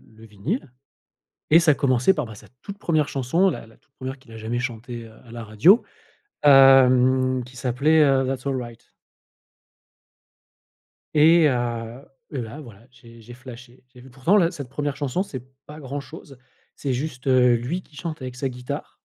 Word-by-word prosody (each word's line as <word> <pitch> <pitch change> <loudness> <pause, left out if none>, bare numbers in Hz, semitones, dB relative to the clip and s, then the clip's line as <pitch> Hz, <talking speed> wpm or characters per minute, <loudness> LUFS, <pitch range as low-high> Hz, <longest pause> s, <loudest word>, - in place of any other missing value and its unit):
le 110 - -15
vinyle 115 - -5 0.8
et 160 - +8
ça 160 -4 +4
commençait 130 +5 +2
par, 150 -4 -3
bah, 110 - -10
sa - - -15 0.2
toute 200 0 -9
1re 155 -6 0
chanson, 155 +9 +1
la - - -7
la 115 - -20
toute - - -40
1re 130 +1 -6
qu'il 120 -3 -18
a 110 - -10
jamais 115 +2 -3
chanté, 120 -1 -6
heu, 110 - -15
à 115 - -14
la 120 -1 -7
radio, 115 - +4 0.6
hem, 130 -2 +5
qui 125 +1 -16
s'appelait, 140 +6 +2
heu, 135 -2 +3
That's 135 0 -4
All 135 - -1
Right. 120 -1 -10 2.3
Et 160 +2 +6
heu 120 0 -3 0.3
et 135 - -3
là, 115 +6 -8
voilà, 115 -4 -14
j'ai 115 -3 -17
j'ai 120 +2 -12
flashé. 125 0 -13
J'ai 125 - -14
vu 130 +1 -15
pourtant 135 +11 +1
la 170 -4 +3
cette 145 -8 -8
1re 145 +1 -4
chanson, 145 +4 -2
c'est 130 -11 -8 0.2
pas 150 +1 -11
grand 140 -1 -6
chose. 140 -2 -13 0.4
C'est 140 - -3
juste, 130 0 -4
heu, 125 -2 +4
lui 130 +11 -3
qui 155 - -25
chante 165 -1 -6
avec 130 -1 -7
sa 135 +1 -3
guitare. 125 -1 -8
130 Hz, 180 wpm, -23 LUFS, 120-145 Hz, 2.3 s, et